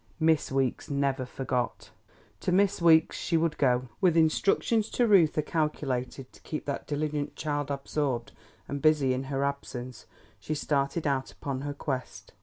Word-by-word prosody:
Miss 160 Hz, -2 st, +2 dB
Weeks 135 Hz, -2 st, -1 dB
never 140 Hz, -2 st, 0 dB
forgot; 125 Hz, -1 st, -3 dB, 0.5 s
to -, -, -1 dB
Miss 195 Hz, 0 st, +2 dB
Weeks 160 Hz, -1 st, +5 dB
she 170 Hz, -, 0 dB
would 160 Hz, -1 st, 0 dB
go. 125 Hz, -2 st, +2 dB
With 175 Hz, -4 st, +4 dB
instructions 200 Hz, +7 st, +2 dB
to 245 Hz, -, +2 dB
Reuther 165 Hz, -7 st, +4 dB
calculated 135 Hz, -5 st, -2 dB
to -, -, -17 dB
keep 155 Hz, -, -5 dB
that 140 Hz, -, -4 dB
diligent 150 Hz, 0 st, -2 dB
child 145 Hz, -2 st, -2 dB
absorbed 140 Hz, -3 st, -2 dB, 0.4 s
and 140 Hz, 0 st, -4 dB
busy 150 Hz, -4 st, +4 dB
in 130 Hz, +1 st, -3 dB
her 135 Hz, 0 st, -1 dB
absence, 130 Hz, -3 st, -5 dB, 0.3 s
she 155 Hz, -, -3 dB
started 145 Hz, +2 st, -1 dB
out 135 Hz, -2 st, 0 dB
upon 135 Hz, -2 st, -5 dB
her 145 Hz, 0 st, -4 dB
quest. 130 Hz, -3 st, -5 dB
145 Hz, 155 wpm, -28 LUFS, 135-160 Hz, 0.5 s, Weeks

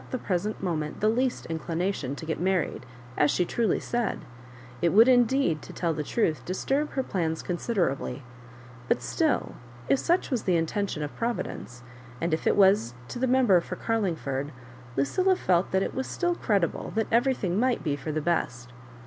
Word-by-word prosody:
he 255 Hz, -, -1 dB
present 200 Hz, -1 st, -2 dB
mo 175 Hz, -3 st, 0 dB
ment 150 Hz, -1 st, -4 dB
the 215 Hz, -, +2 dB
least 250 Hz, +3 st, 0 dB
mclination 165 Hz, -3 st, -2 dB
to 160 Hz, -, -8 dB
get 160 Hz, -1 st, -2 dB
married, 180 Hz, -7 st, 0 dB, 0.3 s
as 145 Hz, -, +3 dB
she 180 Hz, -, +2 dB
truly 230 Hz, +5 st, +1 dB
said; 240 Hz, -2 st, -1 dB, 0.6 s
it 170 Hz, -, +4 dB
would, 220 Hz, +7 st, +7 dB
indeed, 245 Hz, -, +3 dB
to -, -, -10 dB
tell 170 Hz, -2 st, -1 dB
the 155 Hz, -, -3 dB
truth, 155 Hz, -, 0 dB
disturb 270 Hz, -, -1 dB
her 265 Hz, -, 0 dB
plans 165 Hz, -8 st, -2 dB
considerably; 170 Hz, -, -1 dB, 0.6 s
but -, -, +2 dB
still, -, -, 0 dB, 0.4 s
if 275 Hz, -, +4 dB
such 345 Hz, -2 st, +1 dB
was 250 Hz, -4 st, -1 dB
the 185 Hz, -, +3 dB
intention 165 Hz, 0 st, -1 dB
of 145 Hz, -, -6 dB
Providence, 230 Hz, -, -4 dB, 0.4 s
and 165 Hz, -1 st, -1 dB
if 160 Hz, -, -1 dB
it -, -, +4 dB
was 190 Hz, -, +4 dB
to -, -, -5 dB
the 260 Hz, -, +1 dB
Member 245 Hz, -8 st, +4 dB
for -, -, -6 dB
Carlingford, 160 Hz, -, -2 dB, 0.5 s
Lucilla 370 Hz, -, +2 dB
felt 180 Hz, -, +1 dB
that 190 Hz, 0 st, +1 dB
it -, -, -3 dB
was 265 Hz, -, -3 dB
still 350 Hz, -1 st, 0 dB
credible 200 Hz, -, 0 dB
that 220 Hz, 0 st, +1 dB
everything 230 Hz, -6 st, +2 dB
might 250 Hz, 0 st, +1 dB
be 145 Hz, -3 st, 0 dB
for 145 Hz, +2 st, -5 dB
tlie 155 Hz, 0 st, -2 dB
best. 125 Hz, -7 st, -1 dB
185 Hz, 180 wpm, -27 LUFS, 155-235 Hz, 0.6 s, would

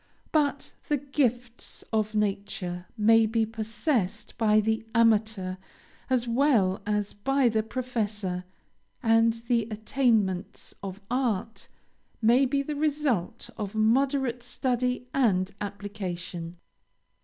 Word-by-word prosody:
But 285 Hz, -3 st, 0 dB
the 295 Hz, -, +2 dB
gifts 250 Hz, -4 st, -2 dB
of 215 Hz, 0 st, 0 dB
nature 195 Hz, -3 st, -2 dB
may 225 Hz, +1 st, +5 dB
be 225 Hz, 0 st, +1 dB
possessed 220 Hz, -, -2 dB
by 215 Hz, -1 st, +4 dB
the 220 Hz, +1 st, 0 dB
amateur 215 Hz, -5 st, +2 dB, 0.5 s
as 250 Hz, -2 st, +1 dB
well 230 Hz, -7 st, +3 dB
as 210 Hz, -1 st, -1 dB
by 270 Hz, +4 st, +2 dB
the 220 Hz, -1 st, +1 dB
professor; 215 Hz, -6 st, -3 dB, 0.6 s
and 225 Hz, 0 st, +4 dB
the 235 Hz, -3 st, +2 dB
attainments 215 Hz, -4 st, 0 dB
of 195 Hz, -1 st, -6 dB
art 230 Hz, -4 st, -1 dB, 0.5 s
may 240 Hz, +4 st, +4 dB
be 275 Hz, +1 st, 0 dB
the 300 Hz, +1 st, -4 dB
result 285 Hz, -, -1 dB
of 210 Hz, -1 st, -4 dB
moderate 250 Hz, +2 st, +2 dB
study 250 Hz, +1 st, -1 dB
and 200 Hz, -8 st, +2 dB
application. 190 Hz, -4 st, -5 dB
225 Hz, 110 wpm, -27 LUFS, 205-250 Hz, 0.6 s, may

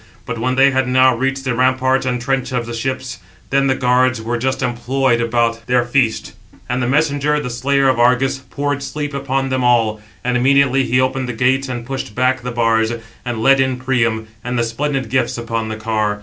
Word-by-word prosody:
But -, -, -5 dB
when 130 Hz, +3 st, 0 dB
they 135 Hz, +1 st, +5 dB
had 130 Hz, -1 st, 0 dB
now 130 Hz, 0 st, +4 dB
reached 135 Hz, +2 st, -2 dB
the 130 Hz, -2 st, -1 dB
ramparts 130 Hz, +1 st, +1 dB
and 125 Hz, -1 st, -1 dB
trench 135 Hz, +1 st, -2 dB
of 120 Hz, -2 st, -1 dB
the 120 Hz, -, -6 dB
ships, 130 Hz, -1 st, -4 dB, 0.3 s
then 135 Hz, 0 st, +2 dB
the 130 Hz, -, +2 dB
guards 125 Hz, -1 st, +2 dB
were 120 Hz, +2 st, -3 dB
just 130 Hz, +2 st, -1 dB
employed 120 Hz, 0 st, 0 dB
about 115 Hz, 0 st, 0 dB
their 125 Hz, -1 st, +2 dB
feast, 120 Hz, -2 st, 0 dB, 0.3 s
and 125 Hz, +1 st, -1 dB
the 120 Hz, -, 0 dB
messenger, 150 Hz, +1 st, +1 dB
the 125 Hz, -4 st, -4 dB
slayer 135 Hz, +3 st, +1 dB
of 130 Hz, -2 st, +2 dB
Argus, 125 Hz, +2 st, +2 dB
poured 145 Hz, +1 st, -3 dB
sleep 145 Hz, +1 st, -4 dB
upon 135 Hz, -1 st, -1 dB
them 130 Hz, -1 st, -1 dB
all; 115 Hz, -3 st, +2 dB, 0.2 s
and 125 Hz, 0 st, 0 dB
immediately 135 Hz, +1 st, +3 dB
he 125 Hz, +1 st, +1 dB
opened 130 Hz, 0 st, 0 dB
the -, -, -2 dB
gates 130 Hz, +3 st, +1 dB
and 120 Hz, -2 st, -5 dB
pushed 130 Hz, -5 st, -5 dB
back 130 Hz, 0 st, +1 dB
the 125 Hz, -, -5 dB
bars, 115 Hz, -1 st, +1 dB, 0.3 s
and 120 Hz, -3 st, -3 dB
led 135 Hz, +2 st, +5 dB
in 130 Hz, -1 st, +1 dB
Priam, 115 Hz, -4 st, 0 dB, 0.2 s
and 125 Hz, 0 st, -3 dB
the 120 Hz, -, +2 dB
splendid 135 Hz, +3 st, -2 dB
gifts 130 Hz, +2 st, 0 dB
upon 115 Hz, -1 st, -3 dB
the 110 Hz, -, -3 dB
car. 110 Hz, -2 st, -1 dB
125 Hz, 205 wpm, -18 LUFS, 120-135 Hz, 0.3 s, they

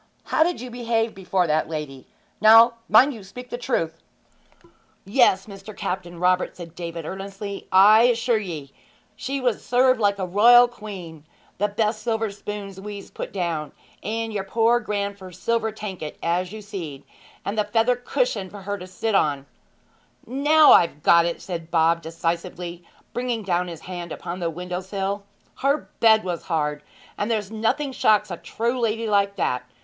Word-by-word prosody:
How -, -, 0 dB
did 350 Hz, +2 st, +2 dB
you 250 Hz, +1 st, -7 dB
behave 230 Hz, -2 st, -1 dB
before 190 Hz, -1 st, 0 dB
that 155 Hz, -1 st, 0 dB
lady? 150 Hz, -4 st, -6 dB, 0.3 s
Now, 225 Hz, +2 st, +8 dB, 0.2 s
mind 260 Hz, +7 st, +6 dB
you 220 Hz, -4 st, -10 dB
speak 250 Hz, +6 st, -11 dB
the -, -, -2 dB
truth!' 165 Hz, -11 st, -2 dB, 1.0 s
'Yes, 195 Hz, -2 st, +3 dB
Mr. 200 Hz, 0 st, -11 dB
Captain 175 Hz, -2 st, -4 dB
Robert,' 180 Hz, +1 st, +1 dB
said 170 Hz, -2 st, -9 dB
David 170 Hz, -2 st, -6 dB
earnestly. 195 Hz, +2 st, -6 dB
'I 205 Hz, +4 st, +7 dB
assure 235 Hz, -1 st, +2 dB
ye 160 Hz, -9 st, -6 dB, 0.4 s
she 275 Hz, +5 st, -3 dB
was 250 Hz, -3 st, -1 dB
served 255 Hz, 0 st, +3 dB
like 200 Hz, -2 st, +2 dB
a 190 Hz, -, -2 dB
royal 235 Hz, +6 st, +7 dB
queen. 190 Hz, -9 st, -9 dB, 0.4 s
The 205 Hz, -, +2 dB
best 215 Hz, +1 st, -1 dB
silver 225 Hz, -1 st, -1 dB
spoons 200 Hz, -1 st, -7 dB
wez 205 Hz, 0 st, -8 dB
put -, -, -6 dB
down, 170 Hz, -5 st, -3 dB, 0.3 s
and 225 Hz, +1 st, -3 dB
yer 200 Hz, -2 st, -2 dB
poor 230 Hz, +4 st, +2 dB
grandfer's 200 Hz, -4 st, -4 dB
silver 230 Hz, +1 st, 0 dB
tanket, 190 Hz, -8 st, -7 dB
as 175 Hz, +2 st, 0 dB
you 215 Hz, 0 st, -8 dB
seed, 165 Hz, -9 st, -7 dB, 0.4 s
and 200 Hz, -, -2 dB
the 215 Hz, -, +2 dB
feather 230 Hz, +3 st, +2 dB
cushion 245 Hz, -, -1 dB
for 200 Hz, 0 st, -11 dB
her 200 Hz, +1 st, -4 dB
to 180 Hz, -, -9 dB
sit 205 Hz, +4 st, -3 dB
on 145 Hz, -7 st, +1 dB, 0.4 s
' -, -, -35 dB
'Now 295 Hz, +4 st, +5 dB
I've 150 Hz, -3 st, +4 dB
got 170 Hz, 0 st, +6 dB
it!' 170 Hz, -, -4 dB
said 170 Hz, -3 st, -6 dB
Bob 165 Hz, 0 st, +3 dB
decisively, 170 Hz, +1 st, -4 dB, 0.3 s
bringing 245 Hz, -3 st, -2 dB
down 180 Hz, -2 st, 0 dB
his 165 Hz, -2 st, -8 dB
hand 175 Hz, -2 st, -7 dB
upon 175 Hz, +2 st, -6 dB
the 170 Hz, -2 st, -1 dB
window 180 Hz, +2 st, -5 dB
sill. 195 Hz, +1 st, -3 dB, 0.3 s
'Her 280 Hz, +2 st, 0 dB
bed 220 Hz, -1 st, +5 dB
was 175 Hz, -3 st, -4 dB
hard! 150 Hz, -3 st, -1 dB, 0.4 s
and 205 Hz, -, -1 dB
there's 215 Hz, -3 st, -1 dB
nothing 230 Hz, +6 st, -1 dB
shocks 210 Hz, -5 st, +2 dB
a 175 Hz, -, -4 dB
true 235 Hz, +7 st, -2 dB
lady 225 Hz, -1 st, 0 dB
like 200 Hz, -1 st, +2 dB
that. 125 Hz, -9 st, -1 dB
200 Hz, 170 wpm, -23 LUFS, 175-225 Hz, 1.0 s, Now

